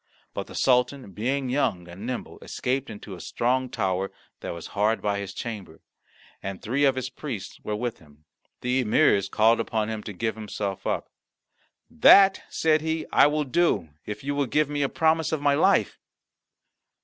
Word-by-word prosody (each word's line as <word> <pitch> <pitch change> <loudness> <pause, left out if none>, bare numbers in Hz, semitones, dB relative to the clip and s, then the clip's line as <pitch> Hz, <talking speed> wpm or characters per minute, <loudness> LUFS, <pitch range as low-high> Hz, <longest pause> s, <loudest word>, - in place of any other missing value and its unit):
But - - -4
the - - -11
Sultan, 125 -2 +1
being 130 +7 -1
young 120 -9 0
and 95 +6 -8
nimble, 125 -1 -5
escaped 130 +2 -2
into 105 -2 -9
a 90 - -9
strong 130 +2 0
tower 95 -3 -1 0.3
that - - -6
was 85 -1 -6
hard 105 +2 +2
by 100 -1 -1
his 100 -2 -5
chamber, 105 -1 -7 0.6
and 95 -1 -5
three 135 +6 +1
of 135 -1 +3
his 130 0 -4
priests 115 -11 -6
were 105 - -2
with 120 +2 -3
him. 75 -1 -21 0.4
The 125 +1 +1
emirs 100 -3 +3
called 115 +2 +4
upon 110 -1 -1
him 110 -1 -4
to 105 - -7
give 110 +4 -2
himself 105 -2 -5
up. - - -2 0.8
"That," 195 - +6
said 155 -1 +2
he, 160 0 -2
"I - - +7
will 150 +1 0
do, 140 - +1
if 105 - -7
you 140 +1 -1
will 140 -1 0
give 150 +3 +1
me 145 0 -1
a 140 - +1
promise 160 0 +2
of 160 - 0
my 145 0 +3
life." 190 +7 +2
120 Hz, 180 wpm, -26 LUFS, 100-140 Hz, 0.8 s, I